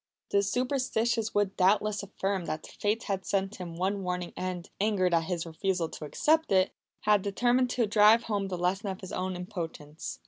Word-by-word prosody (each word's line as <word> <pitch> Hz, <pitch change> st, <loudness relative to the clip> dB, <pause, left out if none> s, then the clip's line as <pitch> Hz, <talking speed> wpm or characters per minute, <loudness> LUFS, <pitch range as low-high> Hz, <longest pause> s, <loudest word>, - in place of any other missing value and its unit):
The 200 Hz, -, +4 dB
superstitious 235 Hz, 0 st, 0 dB
would 205 Hz, -1 st, +1 dB
doubtless 205 Hz, +2 st, +3 dB
affirm 195 Hz, -2 st, -2 dB
that 155 Hz, -1 st, -4 dB
the -, -, -11 dB
Fates 210 Hz, +2 st, 0 dB
had 195 Hz, -2 st, -2 dB
sent 195 Hz, +1 st, -1 dB
him 175 Hz, -3 st, -7 dB
one 195 Hz, +3 st, -1 dB
warning 180 Hz, -1 st, -3 dB
and, 180 Hz, -2 st, -4 dB
angered 195 Hz, -4 st, +2 dB
at 165 Hz, -1 st, +3 dB
his 175 Hz, -1 st, -2 dB
refusal 170 Hz, 0 st, -1 dB
to 155 Hz, -, -7 dB
accept 315 Hz, -, +2 dB
it, 190 Hz, -1 st, +4 dB, 0.3 s
had 210 Hz, -1 st, +4 dB
determined 245 Hz, +6 st, +2 dB
to 240 Hz, -1 st, +1 dB
drive 215 Hz, +2 st, +6 dB
home 205 Hz, -3 st, -1 dB
the 185 Hz, -2 st, -3 dB
lesson 185 Hz, +4 st, 0 dB
of 190 Hz, 0 st, -4 dB
his 190 Hz, -, -8 dB
own 185 Hz, 0 st, -2 dB
impotence. 165 Hz, -5 st, -6 dB
195 Hz, 185 wpm, -29 LUFS, 180-210 Hz, 0.3 s, drive